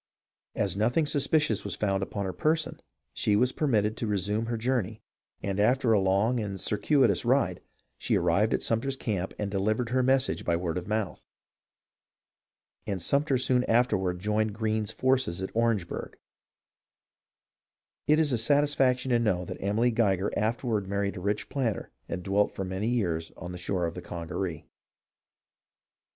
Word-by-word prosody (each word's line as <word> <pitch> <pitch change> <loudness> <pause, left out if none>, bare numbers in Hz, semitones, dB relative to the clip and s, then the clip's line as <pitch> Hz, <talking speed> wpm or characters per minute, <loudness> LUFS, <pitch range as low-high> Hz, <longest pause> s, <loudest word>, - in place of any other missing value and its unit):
As 100 -3 0
nothing 120 +10 +2
suspicious 145 -5 +1
was - - -4
found 95 -2 0
upon 100 +1 -3
her 95 - -3
person 155 - 0 0.3
she 105 - +1
was 125 +4 +3
permitted 110 -8 +1
to 115 - -2
resume 105 +2 -1
her 120 0 -2
journey, 110 -3 -1 0.4
and 100 0 -2
after 120 +2 +3
a 105 - +4
long 100 +6 +2
and 100 -3 -4
circuitous 130 +9 +2
ride 120 -8 +1 0.4
she - - +1
arrived 90 +6 +2
at - - -3
Sumter's 130 +4 0
camp 95 -7 -3
and 105 -1 -3
delivered 110 +4 0
her 130 0 +3
message 130 +1 +1
by 85 - +1
word 85 0 -2
of 90 - -10
mouth. 105 -3 -2 1.6
And 100 -2 -2
Sumter 140 - +2
soon 125 0 +2
afterward 105 -7 +2
Joined 105 +2 0
Greene's 110 -1 -1
forces 130 -9 0
at 95 - -4
Orange 115 -6 +1
burgh. - - -6 1.9
It 150 +1 +5
is 155 -3 +2
a 120 - +2
satisfaction 135 -1 +2
to 120 - +4
know 95 -6 0
that - - -7
Emily 110 +5 +2
Geiger 100 -4 +1
afterward 110 -2 -1
married 100 0 -1
a - - -6
rich 100 +2 -1
planter 120 - -2 0.2
and 90 - -4
dwelt 100 +2 +1
for 95 - -3
many 95 +3 -3
years 85 -9 -1
on 90 - -7
the 90 - -7
shore 90 0 -1
of 85 - -3
the 90 - -7
Congaree. 85 -1 -5
105 Hz, 160 wpm, -28 LUFS, 95-125 Hz, 1.9 s, It